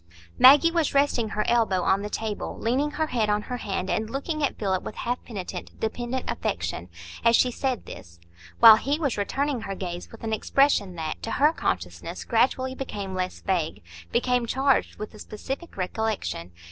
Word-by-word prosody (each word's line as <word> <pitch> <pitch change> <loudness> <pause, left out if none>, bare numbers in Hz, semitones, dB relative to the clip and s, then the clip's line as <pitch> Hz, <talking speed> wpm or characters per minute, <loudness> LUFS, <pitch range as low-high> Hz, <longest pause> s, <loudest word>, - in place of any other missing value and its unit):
Maggie 290 +6 +8
was 330 -4 0
resting 275 -5 +2
her 210 0 -1
elbow 220 -6 +2
on 195 +1 +2
the 210 - -4
table, 215 -1 -4
leaning 260 +6 0
her 315 +1 -1
head 230 -7 0
on 210 0 +1
her 250 +2 -4
hand 195 -5 -3
and 220 +3 -1
looking 305 +5 -3
at 285 - 0
Philip 190 -3 0
with - - -7
half 245 +1 -3
penitent 200 -6 -7
dependent 240 +3 -3
affection, 85 +1 -3 0.3
as 230 0 +5
she 250 - +3
said 255 0 -2
this; 85 0 -11 0.4
while 225 -2 +10
he 285 +5 -1
was 285 -7 -1
returning 270 +5 -1
her 195 -2 -5
gaze 175 -2 -6
with 225 - -13
an 220 -1 -2
expression 220 -5 +2
that, 160 -2 -4
to - - -4
her 290 +7 +3
consciousness, - - -3
gradually 260 -1 +1
became 205 -8 -5
less 185 0 -3
vague,—became 160 - -1
charged 270 +3 +1
with 215 +1 -7
a 215 - -13
specific 270 - -7
recollection. 185 - -3
220 Hz, 175 wpm, -26 LUFS, 190-265 Hz, 0.4 s, while